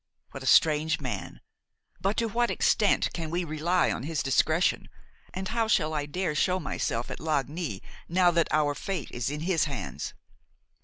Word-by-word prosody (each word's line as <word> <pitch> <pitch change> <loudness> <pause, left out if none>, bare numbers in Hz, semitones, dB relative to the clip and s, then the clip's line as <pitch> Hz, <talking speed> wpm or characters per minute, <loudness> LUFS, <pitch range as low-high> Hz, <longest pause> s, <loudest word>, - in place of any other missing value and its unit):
What - - -8
a - - -5
strange 155 0 +4
man! 125 -9 -5 0.6
But 195 +2 -1
to 230 - +1
what 235 +2 +1
extent 210 -2 +2
can 165 -2 -4
we 175 +2 -1
rely 170 +3 +1
on - - -3
his 150 +2 -2
discretion, 155 +5 +2 0.4
and 190 0 -4
how 225 0 0
shall 160 -7 +2
I 145 -1 -2
dare 180 +1 -2
show 185 +5 +1
myself 120 -6 -2
at - - -6
Lagny 150 - -2 0.3
now 180 +1 +4
that 170 -1 +2
our 150 -1 +2
fate 175 -2 -4
is 120 +1 -2
in 150 +1 -4
his 170 -1 +2
hands? 135 -10 -5
160 Hz, 170 wpm, -28 LUFS, 145-185 Hz, 0.6 s, strange